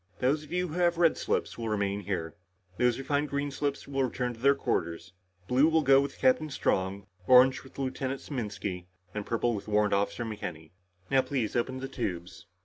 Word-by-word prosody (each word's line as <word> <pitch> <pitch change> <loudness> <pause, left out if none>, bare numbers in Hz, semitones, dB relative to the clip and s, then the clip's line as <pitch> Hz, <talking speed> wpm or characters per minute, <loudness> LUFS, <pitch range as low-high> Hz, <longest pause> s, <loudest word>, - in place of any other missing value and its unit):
Those 140 +4 +1
of 150 - -14
you 180 0 0
who - - -7
have 175 -1 +2
red 170 -2 +4
slips - - -2
will 115 -1 -2
remain 100 -1 0
here. 90 -5 -3 0.5
Those 125 -1 +3
who 135 - -5
find 145 +1 0
green 140 +1 -2
slips 140 0 -3
will 135 -1 0
return 125 -1 -2
to 115 - -14
their 140 +3 +4
quarters. 85 -7 -2 0.3
Blue 130 +6 +4
will 160 -1 +3
go 135 0 +6
with 140 0 -4
Captain 135 +4 +3
Strong, 100 -7 -1 0.2
orange 130 +1 +6
with 130 - -16
Lieutenant 135 0 -2
Saminsky, 105 - -5 0.3
and 105 -1 -5
purple 115 +1 +1
with 100 -1 -5
Warrant 105 -1 +2
Officer 100 +3 0
McKenny. 90 -8 -6 0.4
Now 135 -1 +5
please 130 -4 -2
open 130 +2 -1
the 135 - -3
tubes." 90 -10 -5
125 Hz, 195 wpm, -29 LUFS, 100-140 Hz, 0.5 s, go